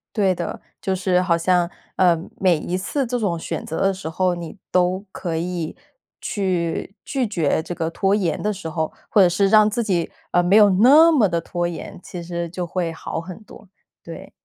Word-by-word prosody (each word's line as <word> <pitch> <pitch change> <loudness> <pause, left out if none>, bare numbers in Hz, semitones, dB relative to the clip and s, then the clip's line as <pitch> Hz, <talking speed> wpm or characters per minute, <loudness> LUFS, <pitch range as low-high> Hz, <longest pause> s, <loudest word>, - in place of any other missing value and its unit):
对 195 -4 +2
的， 170 - -5 0.2
就 190 - -1
是 180 -1 +1
好 170 -2 +2
像， 175 0 +2 0.3
呃， 175 -3 +4 0.2
每 180 -4 +3
一 175 +4 -3
次 270 +9 -2
这 245 +1 -2
种 195 -8 -1
选 - - -5
择 160 - -4
的 195 0 +3
时 185 -4 -6
候， 180 +1 0
你 170 +2 -8
都 185 +2 +1
可 165 -3 -4
以 170 -1 -3 0.4
去 185 -2 -2
拒 265 -3 -1
绝 160 -6 0
这 175 - -5
个 165 -2 -2
拖 195 +3 0
延 180 -7 0
的 210 - 0
时 200 -4 -6
候， 160 0 -2 0.2
或 205 - +5
者 180 - +6
是 195 +3 +2
让 215 +1 +6
自 235 - -1
己， 180 -5 -1 0.2
呃， 175 - +3
没 180 +3 +3
有 205 -1 +7
那 275 - +7
么 240 -9 +4
地 170 -1 0
拖 175 +1 -3
延， 175 - -7
其 175 - -7
实 170 0 -4
就 180 +1 -4
会 170 -1 -2
好 165 0 -5
很 185 +4 -10
多， 205 -1 -15 0.3
对。 - - -10
180 Hz, 220 characters per minute, -22 LUFS, 170-200 Hz, 0.4 s, 有